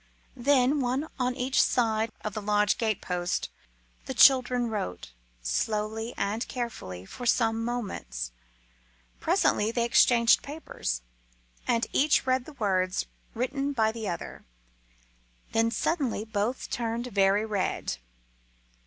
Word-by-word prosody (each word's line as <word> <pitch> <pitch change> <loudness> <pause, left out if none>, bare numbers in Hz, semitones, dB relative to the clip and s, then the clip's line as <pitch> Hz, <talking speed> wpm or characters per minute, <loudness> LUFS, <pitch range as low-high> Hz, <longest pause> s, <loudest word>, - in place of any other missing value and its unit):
Then, 270 +2 +3
one 260 +5 0
on 250 0 0
each 260 0 +2
side 225 -2 +1
of 215 - -3
the 215 - -4
lodge 210 0 +2
gate 220 -4 0
post, 180 -1 -2 0.6
the 265 - -4
children 250 -2 +6
wrote, 90 - -4 0.3
slowly 215 - -1
and 210 +4 -1
carefully, 95 - -5
for 245 - -6
some 225 -1 +2
moments. 205 - -4 0.9
Presently 210 +2 +2
they 235 0 +1
exchanged 235 0 +5
papers, 280 - -4 0.6
and 230 -1 +2
each 290 -1 +3
read 260 -1 +1
the 310 - -11
words 190 -6 0 0.3
written 275 +4 -1
by 220 -4 +2
the 220 -3 -4
other. 175 - -6 1.1
Then 225 0 +3
suddenly 240 -2 -1
both 220 +3 -2
turned 235 0 -2
very 200 -2 +2
red. 205 -4 -2
225 Hz, 120 wpm, -28 LUFS, 210-250 Hz, 1.1 s, children